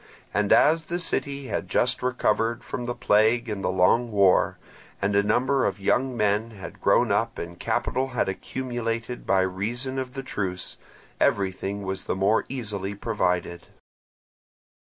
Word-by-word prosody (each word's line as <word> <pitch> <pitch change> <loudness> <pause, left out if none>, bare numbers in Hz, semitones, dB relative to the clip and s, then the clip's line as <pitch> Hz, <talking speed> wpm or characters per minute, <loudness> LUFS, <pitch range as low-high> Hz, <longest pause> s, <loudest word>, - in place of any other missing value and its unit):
And 105 0 +1
as 160 +1 +5
the 175 - -2
city 140 -5 -2
had 95 - -2
just 120 +7 +2
recovered 120 -2 0
from 120 - -5
the 120 0 -3
plague 110 +3 +3
and 105 -3 -4
the - - +1
long 95 +6 +3
war, 100 -3 +3 0.4
and 100 +1 0
a 100 - +5
number 130 +6 +2
of 100 0 -1
young 125 +5 +1
men 105 +1 +1
had 105 -4 -10
grown - - +3
up - - 0
and 85 0 -7
capital 130 +1 -1
had 125 -3 -1
accumulated 120 +2 -4
by 95 -1 +4
reason 115 +8 -2
of 130 0 -5
the 135 - -4
truce, 95 -7 -4 0.4
everything 100 +1 0
was 95 -1 -4
the - - -1
more 100 +4 +2
easily 105 -6 -3
provided. 90 -5 -1
110 Hz, 155 wpm, -25 LUFS, 95-125 Hz, 0.4 s, as